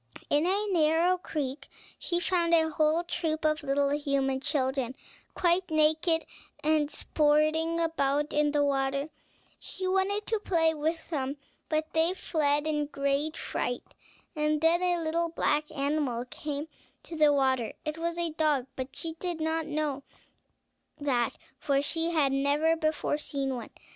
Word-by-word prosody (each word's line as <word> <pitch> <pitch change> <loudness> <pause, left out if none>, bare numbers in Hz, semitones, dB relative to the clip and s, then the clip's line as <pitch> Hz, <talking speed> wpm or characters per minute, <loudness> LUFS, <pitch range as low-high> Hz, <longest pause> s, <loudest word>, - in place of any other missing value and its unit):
In 295 +4 +3
a 400 +3 +1
narrow 330 +1 +3
creek 290 -5 -4 0.3
she 345 0 0
found 345 -2 +2
a 320 -1 +2
whole 310 +2 +2
troop 315 -2 -2
of 310 +1 +2
little 280 0 +1
human 275 -2 0
children, 265 -3 -1 0.4
quite 355 +1 +2
naked, 315 +1 +3 0.4
and 305 -1 +2
sporting 310 +3 +2
about 295 -3 0
in 295 0 +2
the 290 -1 +2
water; 275 +1 0 0.5
she 375 0 -5
wanted 385 +2 +1
to 445 -1 0
play 330 -5 +2
with 320 +2 -2
them, 275 -2 -2 0.3
but 310 0 -1
they 325 +3 +2
fled 295 -5 0
in 310 -1 0
a 295 - 0
great 280 +2 -1
fright; 245 0 -3 0.5
and 300 0 +1
then 330 +2 +4
a 350 -2 +1
little 335 +1 0
black 300 -2 0
animal 280 -4 -1
came 290 +3 -5 0.4
to 335 - -8
the 305 -2 +5
water; 260 -5 +1
it 305 +1 -3
was 335 0 -2
a 340 -1 0
dog, 305 -5 +1
but 265 0 -6
she 325 -1 -4
did 350 -3 -2
not 320 0 -1
know 295 -2 -2 1.0
that, 250 -5 0 0.2
for 275 -1 +1
she 325 +4 0
had 305 -5 +2
never 285 +4 +2
before 310 -2 -1
seen 275 -3 -3
one. 240 - -7
305 Hz, 155 wpm, -29 LUFS, 280-330 Hz, 1.0 s, the